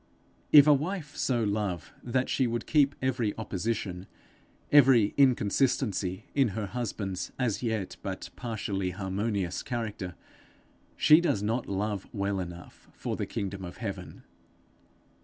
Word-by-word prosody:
If 145 -2 +10
a 150 - +7
wife 150 +1 -2
so 120 -3 +1
love 100 -5 -2
that 125 +1 0
she 130 - +1
would 120 0 -2
keep 145 -2 +3
every 120 -5 0
opposition, 100 -3 -3 0.6
every 130 -7 +6
inconsistency 110 -6 +2
in 135 -4 +3
her 110 - -1
husband's 100 -3 -4
as 120 -6 0
yet 110 -5 -2
but - - -5
partially 100 -5 -3
harmonious 95 0 -2
character, 110 -7 -4 0.8
she 155 +2 +7
does 105 - 0
not 115 +4 -1
love 100 0 -2
well 100 -1 -1
enough 85 -1 -9
for - - -4
the - - -3
kingdom 100 -1 -4
of 90 -1 -8
heaven. - - -6
110 Hz, 130 wpm, -29 LUFS, 95-125 Hz, 0.8 s, If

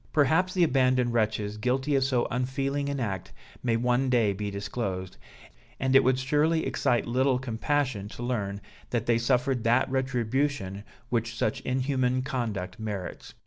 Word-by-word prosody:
Perhaps 160 +6 +3
the 180 - +4
abandoned 130 -5 +3
wretches 105 -2 0
guilty 130 +5 0
of 135 -1 +3
so 130 -3 +1
unfeeling 135 +3 -1
an 140 -1 -2
act 95 -7 -3 0.3
may 115 -2 +1
one 125 +2 +1
day 115 -5 +3
be 105 +1 -3
disclosed, 100 -2 -4 0.6
and 130 +1 +1
it 135 - +8
would 130 0 +3
surely 150 +5 +1
excite 120 - +1
little 130 +2 +2
compassion 125 -2 -1
to 120 +3 -8
learn 100 -5 -2 0.3
that 120 -2 -1
they 115 -1 +3
suffered 125 0 +1
that 120 +3 +3
retribution 130 -5 -1 0.3
which 115 -1 -1
such 110 - 0
inhuman 130 -1 0
conduct 110 -8 -3
merits. 105 -4 -6
125 Hz, 150 wpm, -28 LUFS, 110-135 Hz, 0.6 s, it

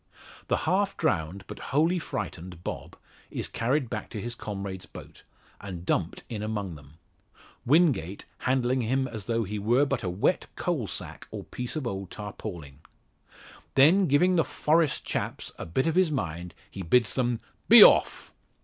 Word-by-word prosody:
The - - +2
half 195 +1 +1
drowned, 90 - -1
but - - -9
wholly 165 +6 +2
frightened, 90 - -6
Bob - - -6 0.3
is - - -3
carried 130 +4 0
back 110 -2 -5
to 110 - -6
his 120 +3 -4
comrades' 100 -4 -6
boat, - - -12 0.4
and 90 -4 -7
dumped 85 -2 -1
in 110 -4 -5
among 105 -4 -3
them; 75 0 -14 0.7
Wingate 130 - +2
handling 130 0 +1
him 130 +3 0
as 110 -5 -7
though 115 -1 0
he 105 +1 -4
were 120 +7 +3
but 135 -3 -1
a 95 - -2
wet 90 +3 0
coal - - -1
sack - - -6
or - - -6
piece 125 +3 -6
of 155 -4 -3
old 95 -5 -4
tarpaulin. 90 -9 -8 1.0
Then 175 +8 +6
giving 180 +6 +4
the 165 - +4
"Forest 155 -1 +1
chaps" - - -3
a - - -5
bit 130 - 0
of 165 - +1
his 185 -1 +4
mind 85 - -4 0.2
he 100 - -7
bids 115 +6 +3
them 120 -3 0 0.3
"be - - +12
off!" - - +4
115 Hz, 165 wpm, -27 LUFS, 95-140 Hz, 1.0 s, be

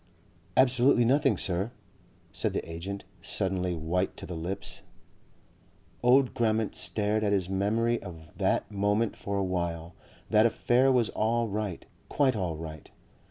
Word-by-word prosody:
"Absolutely 125 -1 +5
nothing, 135 -3 +3
Sir," 95 +4 -1 0.6
said - - -1
the - - -3
agent, 90 +4 -6 0.2
suddenly 90 -2 -1
white 85 +4 -1
to - - -7
the 90 - -6
lips.... 90 +5 -5 1.2
Old 125 +1 +4
Grammont 110 -3 +1
stared 105 +4 0
at 100 -1 +2
his 95 -2 0
memory 115 +5 +1
of 80 -4 -11
that - - 0
moment 105 +2 +1
for 100 0 -4
a 100 - +1
while. 85 -2 -3 0.4
That 110 +1 +6
affair 125 +3 +3
was 125 -4 +3
all 115 +2 0
right, 100 -3 -3 0.2
quite 135 -4 +2
all 90 -6 -2
right. 80 -1 -8
100 Hz, 140 wpm, -28 LUFS, 90-115 Hz, 1.2 s, That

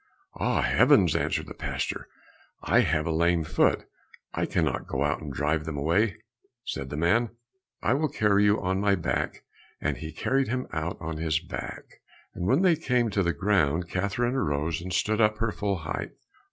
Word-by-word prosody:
"Ah, - - 0
heavens," - - +4
answered - - 0
the - - -9
pastor, - - -3 0.6
"I - - +4
have 75 0 +2
a 80 - -1
lame 85 +1 +2
foot, 80 - +2 0.5
I - - -1
cannot - - -1
go - - -1
out - - 0
and 75 - -6
drive 75 +3 -1
him 80 -2 -4
away." 85 +9 +1 0.5
Said 65 0 -4
the 75 - -5
man, 90 +10 +3
"Then 115 - -21 0.5
I - - +3
will 150 +3 +1
carry 105 -4 +3
you 105 +1 +4
on 95 +1 -1
my 100 -1 +3
back," 85 -3 -2 0.4
and 70 -3 -1
he 80 +5 -6
carried 135 +8 0
him 125 +2 -2
out 80 +2 -2
on 80 -1 -4
his 80 -1 0
back. 85 +1 -8 0.3
And 90 - -3
when 140 - +3
they 180 -3 +5
came 125 -7 +1
to 100 - +1
the 85 -2 +2
ground, 85 -2 +1
Catherine 100 +6 0
arose 80 - -1
and 90 +1 -6
stood 105 +5 +1
up 105 0 +3
her 115 0 0
full 100 -1 -1
height. 80 -2 -5
90 Hz, 190 wpm, -27 LUFS, 80-110 Hz, 0.6 s, they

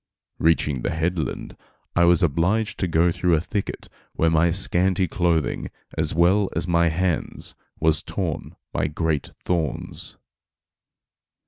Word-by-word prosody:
Reaching 75 -5 +2
the - - -1
headland 80 -1 -2 0.4
I 85 - +5
was 90 +2 +4
obliged 90 +8 +1
to 95 - 0
go 85 +1 +3
through 90 0 +2
a - - +2
thicket 100 +4 -4 0.3
where 80 0 +2
my 80 +1 +4
scanty 90 +1 +2
clothing, 85 -2 0 0.3
as 80 -1 -1
well 95 +4 +3
as - - -1
my 85 -1 +3
hands, 85 +1 -1 0.3
was 80 -2 +3
torn - - -4 0.2
by - - 0
great 75 -1 -1 0.2
thorns. 85 -5 -3
85 Hz, 130 wpm, -23 LUFS, 80-90 Hz, 0.4 s, I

